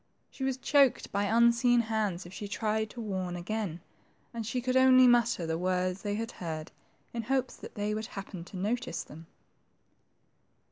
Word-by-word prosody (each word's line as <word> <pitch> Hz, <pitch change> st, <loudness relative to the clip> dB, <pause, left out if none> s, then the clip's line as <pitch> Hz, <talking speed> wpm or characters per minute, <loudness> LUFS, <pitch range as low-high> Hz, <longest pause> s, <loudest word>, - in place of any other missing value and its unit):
She 265 Hz, -, -7 dB
was 265 Hz, -1 st, 0 dB
choked 275 Hz, -1 st, +3 dB
by 200 Hz, +1 st, 0 dB
unseen 235 Hz, +2 st, +4 dB
hands 215 Hz, -5 st, -2 dB
if 175 Hz, -, -11 dB
she 205 Hz, -, -6 dB
tried 220 Hz, +1 st, -1 dB
to 240 Hz, -, -10 dB
warn 190 Hz, -5 st, -3 dB
again, 175 Hz, -1 st, -3 dB, 0.5 s
and 230 Hz, -2 st, -4 dB
she 250 Hz, +3 st, -1 dB
could 255 Hz, +1 st, -1 dB
only 260 Hz, 0 st, +7 dB
mutter 240 Hz, -7 st, +3 dB
the 160 Hz, 0 st, -2 dB
words 185 Hz, +1 st, 0 dB
they 205 Hz, -1 st, -2 dB
heard, 170 Hz, -8 st, -5 dB, 0.4 s
in 235 Hz, -, -2 dB
hopes 260 Hz, +2 st, -1 dB
they 210 Hz, 0 st, -4 dB
would 215 Hz, +1 st, -3 dB
happen 195 Hz, -3 st, -7 dB
to 185 Hz, -, -9 dB
notice 240 Hz, +7 st, -2 dB
them. 160 Hz, +2 st, -13 dB
215 Hz, 160 wpm, -30 LUFS, 185-240 Hz, 0.5 s, only